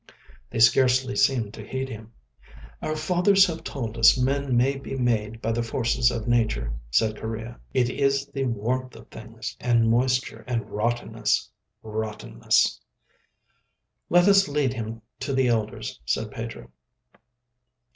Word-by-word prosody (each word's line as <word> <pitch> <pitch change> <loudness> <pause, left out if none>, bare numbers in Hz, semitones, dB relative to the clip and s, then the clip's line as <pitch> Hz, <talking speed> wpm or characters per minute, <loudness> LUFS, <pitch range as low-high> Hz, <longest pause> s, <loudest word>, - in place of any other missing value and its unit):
They - - -6
scarcely 130 +3 +4
seemed 115 -6 +2
to 110 - -9
heed 130 +4 -4
him. 110 -2 -9 0.7
"Our 155 - -2
fathers 180 +5 +4
have 165 -3 -5
told 115 -4 -5
us 115 - +7
men 135 0 +1
may 135 +3 +3
be 135 0 -6
made 115 -3 -1
by 115 - 0
the 115 +1 0
forces 115 +1 +1
of 115 -2 -4
Nature," 110 - +1 0.2
said 110 - +1
Correa. 110 +1 -6
"It 125 -2 +2
is 140 +2 +1
the 140 -1 -3
warmth 125 +2 -2
of - - -14
things, 110 0 -8
and 115 -2 +2
moisture, 125 -2 0
and 115 -4 -3
rottenness—rottenness." 110 - -1 1.3
"Let 175 +2 +5
us 195 -1 +6
lead 145 -3 0
him 115 -2 -6 0.2
to 140 - -3
the 130 -2 +2
elders," 110 - -2
said - - -1
Pedro. - - -7
120 Hz, 135 wpm, -25 LUFS, 110-135 Hz, 1.3 s, us